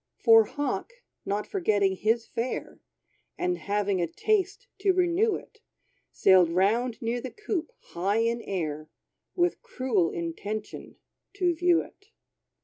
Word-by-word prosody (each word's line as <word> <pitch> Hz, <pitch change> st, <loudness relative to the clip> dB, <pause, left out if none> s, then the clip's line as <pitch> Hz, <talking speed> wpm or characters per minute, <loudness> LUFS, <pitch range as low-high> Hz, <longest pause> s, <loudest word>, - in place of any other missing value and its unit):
For 225 Hz, -2 st, +6 dB
Hawk, 290 Hz, -, -3 dB, 0.3 s
not 205 Hz, +1 st, -1 dB
forgetting 205 Hz, -, +1 dB
his 225 Hz, +4 st, +1 dB
fare, 240 Hz, +2 st, -4 dB, 0.6 s
And 360 Hz, 0 st, -1 dB
having 200 Hz, -2 st, 0 dB
a 170 Hz, -, 0 dB
taste 405 Hz, -, -1 dB
to 390 Hz, -1 st, +3 dB
renew 365 Hz, +4 st, +2 dB
it, 440 Hz, -, -11 dB, 0.5 s
Sailed 185 Hz, -3 st, +5 dB
round 220 Hz, +7 st, +1 dB
near 235 Hz, +2 st, -1 dB
the 260 Hz, -, -5 dB
coop, 400 Hz, -4 st, -4 dB, 0.2 s
high 195 Hz, +5 st, 0 dB
in 235 Hz, +1 st, 0 dB
air, 155 Hz, -6 st, -4 dB, 0.5 s
With 350 Hz, 0 st, +1 dB
cruel 255 Hz, -, 0 dB
intention, 200 Hz, +6 st, -5 dB, 0.4 s
to 360 Hz, -3 st, +2 dB
view 345 Hz, 0 st, +3 dB
it. 400 Hz, -, -19 dB
235 Hz, 130 wpm, -27 LUFS, -, 0.6 s, For